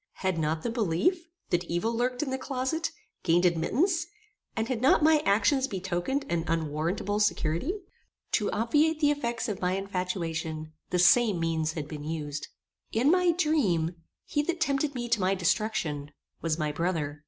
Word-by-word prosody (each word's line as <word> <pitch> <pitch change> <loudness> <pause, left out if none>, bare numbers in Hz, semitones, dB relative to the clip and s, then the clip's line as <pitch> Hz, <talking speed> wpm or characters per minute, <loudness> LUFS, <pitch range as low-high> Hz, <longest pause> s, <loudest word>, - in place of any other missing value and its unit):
Had 185 -3 +1
not 155 +1 -1
the 235 - -1
belief, 230 - +1 0.2
that 175 0 +2
evil 175 +8 -1
lurked 245 +3 0
in 270 - -3
the 265 - -2
closet, 275 +6 -2 0.3
gained 175 +1 +3
admittance, 315 - +2 0.5
and 225 0 -1
had 250 -4 -2
not 270 +3 +5
my 310 0 +6
actions 260 +7 +3
betokened 190 +7 -2
an 170 -1 0
unwarrantable 165 +6 -1
security? 210 - +1 0.6
To 210 - +1
obviate 300 +8 +2
the 295 -2 +4
effects 240 -5 -2
of 205 -4 -4
my 180 0 +1
infatuation, 170 -5 -3 0.2
the 180 - 0
same 200 +2 +5
means 160 -1 0
had 155 -3 -4
been 150 -2 -7
used. 150 -2 -4 0.4
In 250 +7 +3
my 360 -1 +4
dream, 230 - +1 0.3
he 295 - 0
that 345 +3 -2
tempted 280 -1 0
me 240 -1 -3
to 235 -3 +1
my 190 +1 +2
destruction, 180 -6 0 0.3
was 165 -1 0
my 155 -2 -1
brother. 150 -2 -2
195 Hz, 165 wpm, -28 LUFS, 165-265 Hz, 0.6 s, my